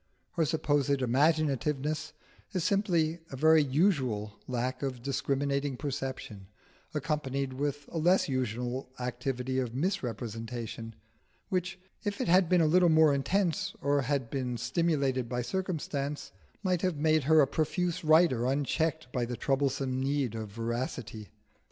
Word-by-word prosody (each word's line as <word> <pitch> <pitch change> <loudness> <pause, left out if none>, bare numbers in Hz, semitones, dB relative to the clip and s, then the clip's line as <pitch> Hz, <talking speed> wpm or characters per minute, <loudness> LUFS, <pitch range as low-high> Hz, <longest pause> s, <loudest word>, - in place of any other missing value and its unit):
Her 165 -2 +1
supposed 145 -3 +1
imaginativeness 150 +2 +1 0.4
is 185 -4 0
simply 175 -5 +1
a - - -6
very 155 +3 +5
usual 130 - +1
lack 125 +1 -2
of 130 -4 -4
discriminating 140 0 -1
perception, 130 -8 -5 0.5
accompanied 140 -3 -1
with 145 +1 -3
a 165 - -2
less 180 +4 +3
usual 125 -1 -2
activity 125 +1 -2
of 125 -2 -3
misrepresentation, 115 - -3 0.5
which, 180 -1 -2 0.2
if 205 -1 -2
it - - -1
had 180 0 +5
been 180 -2 +5
a - - +4
little 175 +3 +5
more 160 -2 +6
intense, 185 +6 0
or 140 0 +2
had 135 -3 -1
been 125 -3 -2
stimulated 130 -1 0
by 125 0 -1
circumstance, 150 -3 -3 0.3
might 180 -3 +1
have 185 -4 0
made 155 -1 +2
her 160 +1 +6
a 145 - +7
profuse 175 +4 -1
writer 155 -6 +4
unchecked 155 +4 0
by 125 - 0
the 120 0 -3
troublesome 135 0 0
need 135 -3 0
of 110 -2 -5
veracity. 115 -1 -4
140 Hz, 135 wpm, -30 LUFS, 125-160 Hz, 0.5 s, a